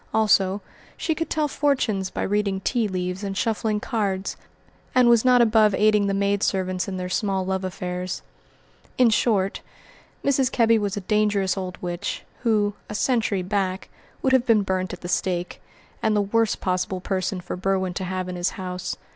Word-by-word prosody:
Also, 205 -3 +3 0.3
she 320 - 0
could 325 0 -3
tell 305 -1 +1
fortunes 255 -10 0
by - - -3
reading 200 -1 0
tea 235 +1 +1
leaves 180 0 -3
and 195 -1 -3
shuffling 220 -1 0
cards, 200 -4 -2 0.6
and 250 -1 +6
was 235 -2 +5
not 250 -1 +6
above 215 -3 +4
aiding 210 -1 +3
the 195 - 0
maid 200 0 +1
servants 185 -2 0
in 190 -1 -4
their 180 0 -3
small 190 0 -1
love 190 0 -1
affairs. 180 0 -4 0.7
In 245 -3 +5
short, 200 -3 +1 0.6
Mrs. 270 -2 +2
Kebby 230 -1 +4
was 205 -1 -2
a - - -2
dangerous 205 -1 +1
old 185 -2 -5
witch, 175 -1 -3 0.2
who, 210 -3 +1 0.2
a 210 - -5
century 220 -5 +1
back, 190 0 -2 0.3
would 265 - +2
have 255 -1 +3
been 220 -3 +4
burnt 185 -1 -1
at 180 - -8
the 175 - -6
stake; 175 0 -2 0.4
and 220 -1 +2
the 205 - +3
worst 220 +2 +1
possible 185 0 -1
person 185 0 -2
for 175 - -5
Berwin 190 0 0
to 190 - -4
have 185 0 -3
in 180 - -5
his 175 0 +1
house. 180 -1 -4
200 Hz, 180 wpm, -24 LUFS, 185-220 Hz, 0.7 s, and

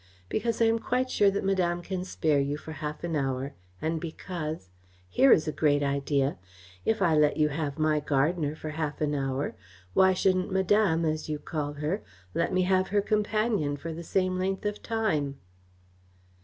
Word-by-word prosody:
Because 230 +1 0
I - - +5
am 225 0 +3
quite 255 +2 -1
sure 205 - +4
that 195 - -2
Madame 175 -3 +1
can 185 0 -3
spare 155 -5 +1
you 140 +1 -1
for 160 - -9
half 150 +1 -5
an 170 -2 -2
hour, 135 -1 -1 0.3
and 160 0 -1
because 160 - -5 0.4
here 265 - +4
is 155 - +5
a - - +1
great 145 -2 +2
idea 140 -4 0 0.5
if 220 -3 +2
I 165 -3 +4
let 150 -1 +3
you 150 -1 +3
have 150 -1 -3
my 155 -1 +2
gardener 150 +2 0
for 155 0 -6
half 150 -1 -3
an 150 -1 0
hour, 135 0 -1 0.4
why 190 0 +5
shouldn't 185 +1 +1
Madame, 190 -3 +3
as 155 0 -2
you 150 - -1
call 145 -1 -4
her, 150 +8 -2 0.3
let 170 - 0
me 185 0 +2
have 185 0 +2
her 205 +1 +2
companion 210 -8 0
for 165 +3 -5
the 165 - -6
same 185 +1 0
length 190 +2 -2
of 210 0 -2
time?" 155 -12 -1
160 Hz, 185 wpm, -28 LUFS, 150-190 Hz, 0.5 s, I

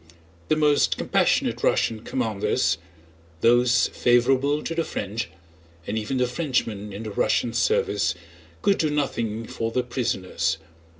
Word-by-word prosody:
The 155 - +3
most 150 -2 +3
compassionate - - +1
Russian 110 -2 +1
commanders, 110 -8 0 0.6
those 120 0 +4
favorable 135 +4 +2
to - - -3
the 165 0 0
French—and 85 - -7
even 110 +4 -2
the 125 - +2
Frenchmen 125 -6 -2
in 100 +3 -6
the 110 - -5
Russian 115 +3 +1
service—could 85 - -1
do 155 - +2
nothing 115 -6 -2
for 115 0 -3
the 125 +2 0
prisoners. 95 - -1
115 Hz, 120 wpm, -24 LUFS, 95-130 Hz, 0.6 s, those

